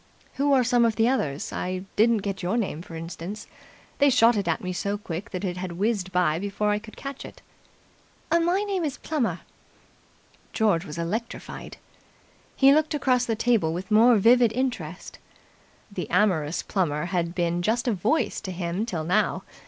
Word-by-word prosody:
"Who 285 +1 +1
are 265 -2 +5
some 245 0 +3
of 230 -2 +2
the 225 0 +3
others? 155 - -1
I 185 +1 -3
didn't 220 -1 +3
get 195 -2 -3
your 185 +6 0
name, 190 -8 -2
for 170 -1 -10
instance. 170 +5 -7 0.5
They 285 0 +5
shot 240 -2 +5
it 200 -4 -1
at 165 - -1
me 185 0 -3
so 200 +4 -2
quick 200 +1 -6
that 185 0 -5
it 180 -2 -2
had 180 -1 -5
whizzed 195 0 -1
by 175 -3 +2
before 205 +2 -1
I 210 - +1
could 215 0 -13
catch 275 -1 -7
it." - - -12 0.9
"My 345 +4 +2
name 390 -4 -2
is 290 -4 -2
Plummer." 295 -7 -2 1.1
George 200 -6 +2
was 150 -1 -8
electrified. 210 +8 -5 0.8
He 275 0 +6
looked 310 0 +2
across 255 -3 +2
the 225 - 0
table 220 -8 +1
with 185 +4 -6
more 230 +3 +6
vivid 235 +2 +5
interest. 225 -10 -4 0.7
The 180 -5 -5
amorous 170 -7 +1
Plummer 160 -5 -1
had 175 -1 -2
been 175 -1 0
just 230 +6 0
a 235 - +2
Voice 210 - 0
to 190 - -5
him 180 +4 -3
till 170 -9 -3
now. 190 +2 +1
205 Hz, 175 wpm, -25 LUFS, 175-240 Hz, 1.1 s, He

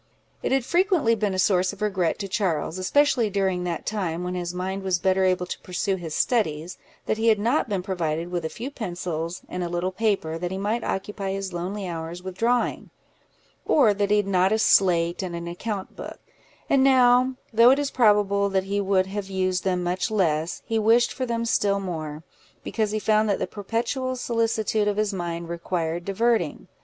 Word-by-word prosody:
It - - -2
had 265 -2 +2
frequently 350 - +2
been 205 -3 -1
a - - -2
source 185 0 +2
of 205 - -13
regret 185 -6 0
to 200 - -4
Charles, 185 -4 -1
especially 245 +2 +2
during 190 -2 0
that 170 -2 -3
time 180 -5 -2
when 180 0 -3
his 175 -1 -3
mind 190 +2 -3
was 190 -2 +1
better 190 +1 +2
able 185 -1 +2
to - - -6
pursue 190 +2 -2
his 165 -4 -6
studies, 175 -8 0 0.3
that 215 - -1
he 225 - +1
had 220 -1 +5
not 235 +5 +1
been 195 -3 -1
provided 170 -3 -2
with 175 -2 -2
a 160 - -2
few 250 - -6
pencils, 175 - -4
and 180 0 -4
a 175 - -3
little 175 +2 -1
paper, 190 -6 -1
that 175 +1 -2
he 190 - -4
might 215 +4 -1
occupy 195 0 -3
his 195 -1 -4
lonely 185 +3 -4
hours 170 +1 -6
with 185 -1 -6
drawing; 240 +4 0 0.7
or 250 -9 +4
that 200 0 -1
he 210 - +4
had 205 - +1
not 190 0 +2
a 220 - +3
slate 175 -5 +3
and 180 -2 -4
an 170 0 -5
account 195 +3 -5
book; - - -8 0.5
and 270 -1 +3
now, 255 -1 +5 0.2
though 230 +2 +7
it 265 - +5
is 285 -1 -1
probable 205 -4 +3
that 190 -1 +1
he 200 +1 -1
would 190 -1 +2
have 195 0 -5
used 185 -1 0
them 180 -2 0
much 180 +4 -1
less, 170 -6 0
he 225 -1 0
wished 230 +3 +3
for 255 - -3
them 230 0 -1
still 200 -3 +1
more, 160 -5 -5 0.4
because 220 -2 -1
he 215 - -1
found 215 0 +2
that 200 - +2
the - - -1
perpetual 235 +5 -2
solicitude 225 -3 0
of 205 0 0
his 215 -1 0
mind 170 -2 -4
required 170 0 -3
diverting. 200 -3 0
195 Hz, 200 wpm, -25 LUFS, 180-220 Hz, 0.7 s, though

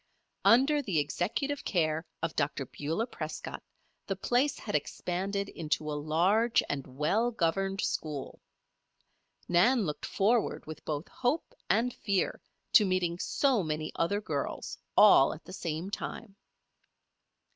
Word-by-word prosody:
Under 275 +5 +5
the 195 - -2
executive 215 - -1
care 160 -2 0 0.2
of 165 - -1
Dr. 140 -2 -1
Beulah 160 - -2
Prescott - - -6 0.5
the 195 - -1
place 245 +8 +1
had - - -6
expanded 200 +3 -2
into 155 -1 -2
a - - -2
large 175 +10 +2
and 140 -2 -3
well 210 +11 +2
governed 195 -1 0
school. 150 -4 -3 1.1
Nan 200 +6 +4
looked 150 -2 -4
forward 220 +3 +1
with 155 0 -9
both 150 +1 -3
hope 265 +6 -1 0.2
and 235 +5 +2
fear 200 -3 -1 0.3
to 215 - +8
meeting 180 -3 0
so 265 -1 +2
many 155 -2 -3
other 200 +5 0
girls 210 - -3 0.2
all 195 -11 +7
at 155 - -14
the 185 - -10
same 170 +1 -4
time. 205 -1 -6
185 Hz, 130 wpm, -30 LUFS, 155-225 Hz, 1.1 s, to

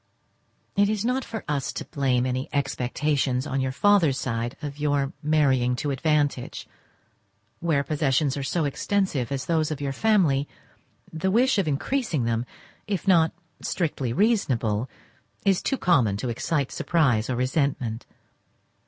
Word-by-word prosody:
It 200 0 +3
is 215 0 -1
not 255 +2 0
for 225 -1 -6
us 145 -2 -1
to - - -5
blame 130 -3 0
any 130 +1 -2
expectations 135 -1 0
on 135 -2 -1
your 130 0 -1
father's 160 -1 +3
side 120 -2 -3
of 145 -2 -6
your 145 -2 0
marrying 135 -5 +2
to 145 +3 -2
advantage; 145 -2 0 0.9
where 160 -5 +1
possessions 145 -2 +1
are 140 - -3
so 155 +4 0
extensive 145 - -1
as 135 -2 -2
those 160 -2 +1
of 155 -3 -4
your 140 -1 -2
family, 160 -8 +2 0.7
the 165 +4 -1
wish 235 +3 +3
of 190 - 0
increasing 155 - 0
them, 115 +1 -1 0.4
if 200 -1 -3
not 165 -4 +5 0.3
strictly 145 -8 -2
reasonable, 125 - +1 0.6
is 195 -2 +3
too 270 - 0
common 125 - +3
to 125 +4 -3
excite 140 +4 -1
surprize 130 -10 +1
or 130 - 0
resentment. 130 -3 -1
145 Hz, 145 wpm, -25 LUFS, 130-170 Hz, 0.9 s, not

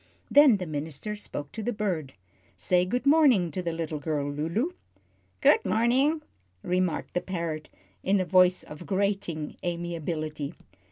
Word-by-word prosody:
Then 280 -6 +7
the 185 - -4
minister 155 +6 -4
spoke 145 -8 -7
to 220 - -6
the 240 - -1
bird. 180 - -2 0.4
"Say 180 - +2
good 245 +8 -2
morning 275 - +5
to 185 - -3
the 170 -1 -2
little 165 -2 -3
girl, 145 -2 -2
Lulu." 165 - -1 0.7
"Good 450 - +5
morning," 265 +8 +2 0.4
remarked 180 -2 -1
the 180 - 0
parrot, 165 -4 -4 0.3
in 195 +1 +2
a 185 - 0
voice 185 0 +4
of 150 +3 -10
grating 195 -6 -1
amiability. 165 -3 -3
180 Hz, 145 wpm, -27 LUFS, 155-210 Hz, 0.7 s, Then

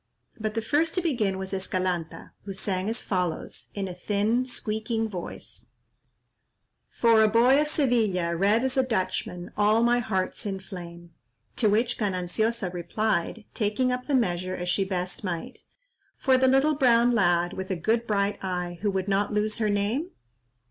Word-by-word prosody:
But 215 0 -3
the 225 - -1
first 315 +7 +1
to 365 - +1
begin 220 - 0
was 190 +1 -5
Escalanta, 185 -3 -2
who 195 - -5
sang 190 0 -1
as 230 +2 -2
follows, 180 -4 -3
in 195 -1 -2
a 180 - -5
thin 210 +7 0
squeaking 220 -1 -2
voice:— 185 -5 -7 1.2
"For 230 -2 +4
a 220 - +6
boy 245 +6 +5
of 300 - 0
Sevilla, 220 - +1
Red 205 +7 +3
as 265 0 -1
a 265 - +5
Dutchman, 185 -6 -2
All 210 +2 +3
my 240 +1 +4
heart's 205 -1 -2
in 195 -1 -3
flame." 175 -3 -10 0.5
To 215 - +3
which 230 +4 +1
Gananciosa 195 +1 -1
replied, 210 +3 -1
taking 215 +4 +1
up 250 0 -3
the 285 - +2
measure 185 -6 0
as 180 0 -4
she 195 - +2
best 185 0 -4
might— 175 -4 -4 0.6
"For 265 -2 +3
the 260 0 +4
little 270 +4 +4
brown 245 -4 +4
lad, 175 -5 +2
With 190 0 -5
a 190 - 0
good 225 +7 0
bright 200 -1 0
eye, 180 -2 -3
Who 210 - +1
would 190 -1 -2
not 200 +1 +1
lose 210 +1 0
her 215 -2 +1
name?" 210 - 0
210 Hz, 170 wpm, -26 LUFS, 185-235 Hz, 1.2 s, a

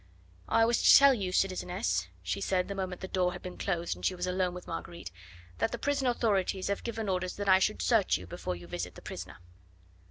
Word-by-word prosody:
"I 225 - +4
was 235 0 +2
to - - +9
tell 280 -1 +7
you, 195 -7 -2
citizeness," 185 +2 0 0.2
she - - -2
said 180 -1 0
the 200 - -4
moment 185 -2 -4
the 190 - -4
door 180 -1 0
had - - -9
been 180 -1 -7
closed 170 - -1
and 90 - -14
she 185 - +1
was 180 0 -3
alone 180 -1 -1
with 180 - -8
Marguerite, 170 - -7 0.5
"that - - +1
the 240 - -3
prison 275 +1 0
authorities 200 -6 0
have 200 - -2
given 225 -2 -4
orders 185 -1 -1
that 205 0 -4
I 190 -1 +6
should 215 +3 0
search 225 -6 +3
you 90 - -10
before 90 +1 -5
you 85 0 -11
visit 85 0 -5
the - - -13
prisoner." - - -7
185 Hz, 225 wpm, -30 LUFS, 180-215 Hz, 0.5 s, to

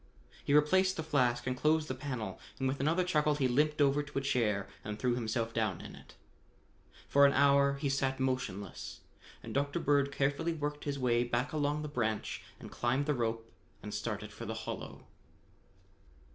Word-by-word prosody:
He 145 - +2
replaced 185 +6 +4
the 160 - -2
flask 130 -6 +1
and 130 0 -1
closed 155 +3 +2
the - - -2
panel, 125 -8 -5 0.2
and 135 - 0
with 135 +1 -1
another 160 +6 +2
chuckle 150 -4 +2
he 140 -3 +2
limped 150 +5 +2
over 145 0 +4
to 145 -1 -7
a - - +2
chair 115 -8 +1 0.2
and 105 0 -5
threw 125 +1 +1
himself 115 -1 -2
down 110 -6 0
in - - -9
it. - - -15 0.9
For 140 - +5
an 140 - +2
hour 140 0 +4
he 140 +1 -2
sat 135 -1 0
motionless 125 -8 -3 0.4
and - - -7
Dr. 140 +4 0
Bird 145 -3 +2
carefully 145 +4 0
worked 150 -1 -4
his 140 -1 -2
way 120 -2 +2
back 120 +4 -1
along 150 0 0
the - - -3
branch 110 -7 -2 0.2
and - - -10
climbed 125 +4 0
the 150 - +1
rope 115 -2 -2 0.3
and - - -6
started - - -4
for - - -8
the - - -3
hollow. - - -6
140 Hz, 185 wpm, -32 LUFS, 120-150 Hz, 0.9 s, For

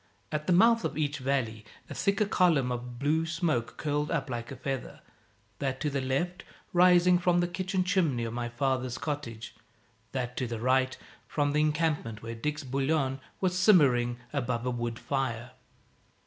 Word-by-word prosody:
At 150 0 -3
the - - +2
mouth 230 +6 +5
of - - -2
each 150 -1 -1
valley 130 -5 -1 0.2
a - - -7
thicker 200 +1 +1
column 165 -10 +3
of 120 0 -5
blue 150 +5 +1
smoke 160 -8 -1
curled 150 0 -1
up 140 -5 -1
like 120 -1 -4
a - - -5
feather 135 +1 -4 0.6
that 135 -1 -2
to 150 - 0
the 140 -1 -1
left 170 +8 -1 0.3
rising 180 0 +6
from 175 0 +3
the 175 - +2
kitchen 185 +1 -1
chimney 175 -10 +1
of 115 -1 -3
my 120 0 -3
father's 130 0 -1
cottage, 125 -7 -5 0.6
that 125 -2 -3
to 125 - -1
the 115 -1 -4
right 130 +2 +2 0.3
from 145 -1 0
the 150 - +3
encampment 150 -8 0
where 115 0 -5
Dick's 150 +6 -3
bouillon 135 +1 0 0.2
was 185 -1 +1
simmering 135 - +4 0.2
above 125 -4 -1
a 125 - 0
wood 120 -1 -3
fire. 120 -3 -2
140 Hz, 170 wpm, -29 LUFS, 125-165 Hz, 0.6 s, rising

